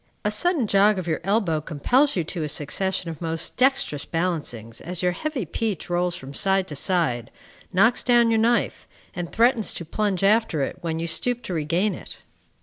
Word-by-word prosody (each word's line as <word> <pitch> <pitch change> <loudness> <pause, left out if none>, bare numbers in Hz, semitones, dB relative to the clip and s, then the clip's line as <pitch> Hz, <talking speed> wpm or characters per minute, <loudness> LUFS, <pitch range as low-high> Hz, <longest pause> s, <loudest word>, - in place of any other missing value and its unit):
A 210 - +2
sudden 305 +4 +1
jog 205 0 +4
of 185 - -3
your 160 -2 -1
elbow 195 -5 +1
compels 245 - +1
you 175 - 0
to 170 +2 -5
a 150 - -2
succession 170 +5 -1
of 160 - -10
most 165 -1 -2
dexterous 255 - +2
balancings 150 -10 -3
as 180 +1 -4
your 180 - +3
heavy 265 - -3
peach 195 +1 -3
rolls 175 0 0
from 135 -2 -9
side 190 +4 +2
to 150 - -5
side, 140 - 0 0.4
knocks 220 +6 +3
down 240 -2 +4
your 225 - +3
knife, 235 +2 +1 0.3
and 175 -2 -4
threatens 235 -1 +2
to 170 - -4
plunge 200 +2 -1
after 200 -7 +3
it - - -4
when 165 -1 -2
you 165 - -2
stoop 245 +9 0
to 185 - -5
regain 170 +6 0
it. - - -10
180 Hz, 190 wpm, -24 LUFS, 160-220 Hz, 0.4 s, jog